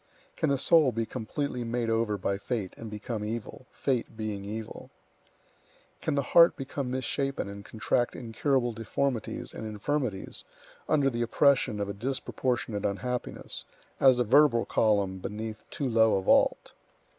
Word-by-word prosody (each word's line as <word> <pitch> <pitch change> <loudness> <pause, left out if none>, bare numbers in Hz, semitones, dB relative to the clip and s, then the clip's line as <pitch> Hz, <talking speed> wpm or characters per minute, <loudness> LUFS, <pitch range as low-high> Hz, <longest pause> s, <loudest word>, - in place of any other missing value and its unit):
Can 155 - 0
the 140 - +2
soul 155 -1 +4
be 115 0 -1
completely 125 +2 -3
made 120 0 -1
over 115 -2 +1
by 100 +1 -1
fate, 105 -4 -3
and 115 - -8
become 105 +1 -4
evil, 115 +3 -5
fate 125 -4 -2
being 105 -3 -3
evil? 110 +2 -7 1.1
Can 155 - 0
the 140 - +1
heart 170 +6 +6
become 135 -1 -4
misshapen 135 0 -1
and 100 0 -8
contract 120 +3 0
incurable 120 +1 0
deformities 115 +2 -2
and - - -7
infirmities 110 0 -3 0.5
under 140 -3 +3
the 120 0 -2
oppression 125 -2 +3
of 100 - -1
a 100 - -3
disproportionate 120 -1 -2
unhappiness, 125 +5 -2 0.3
as 130 -2 +6
the 125 - +3
vertebral 125 0 +5
column 100 -4 +1
beneath 110 +2 -6
too 140 - -3
low 110 -2 +4
a - - -1
vault? - - +3
115 Hz, 145 wpm, -29 LUFS, 105-135 Hz, 1.1 s, heart